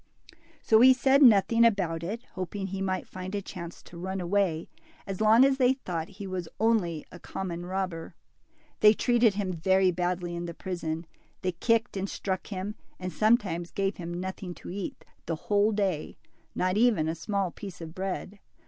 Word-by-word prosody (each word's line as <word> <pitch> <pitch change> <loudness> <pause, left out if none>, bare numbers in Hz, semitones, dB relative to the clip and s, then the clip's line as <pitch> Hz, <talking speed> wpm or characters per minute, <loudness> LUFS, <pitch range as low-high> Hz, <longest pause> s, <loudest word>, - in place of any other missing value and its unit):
So 220 0 +5
he 260 +1 +9
said 265 +3 +4
nothing 230 -1 +6
about 190 -8 +2
it, 215 +8 -4
hoping 190 +1 -4
he 195 0 -4
might 185 -1 -2
find 185 +2 -6
a - - 0
chance 170 -3 -8
to 170 - -12
run 190 +2 -3
away, 175 -3 0 0.4
as 195 0 -5
long 220 +4 +7
as 275 -1 +2
they 255 0 +5
thought 175 - -4
he 200 - -6
was 185 -3 -4
only 200 -8 +1
a 180 - -11
common 175 -2 -5
robber. 180 -3 -3 0.6
They 210 0 +7
treated 235 -4 +3
him 195 -3 -1
very 190 +3 +3
badly 175 0 -2
in 170 0 -4
the 170 - -7
prison. 170 -3 -4 0.4
They 185 - +1
kicked 230 +6 +1
and 195 0 -2
struck 190 -2 -3
him, 200 +1 -4 0.3
and 185 0 -5
sometimes 200 -6 +2
gave 195 0 -1
him 170 -1 -6
nothing 185 -1 -5
to - - -9
eat 195 0 -6 0.2
the 165 - 0
whole 205 +6 +2
day, 195 -7 -1 0.4
not 185 +2 +1
even 215 -9 +3
a 160 - 0
small 195 +2 -2
piece 190 -2 -9
of 160 -1 -8
bread. 195 +2 -4
190 Hz, 180 wpm, -28 LUFS, 175-210 Hz, 0.6 s, he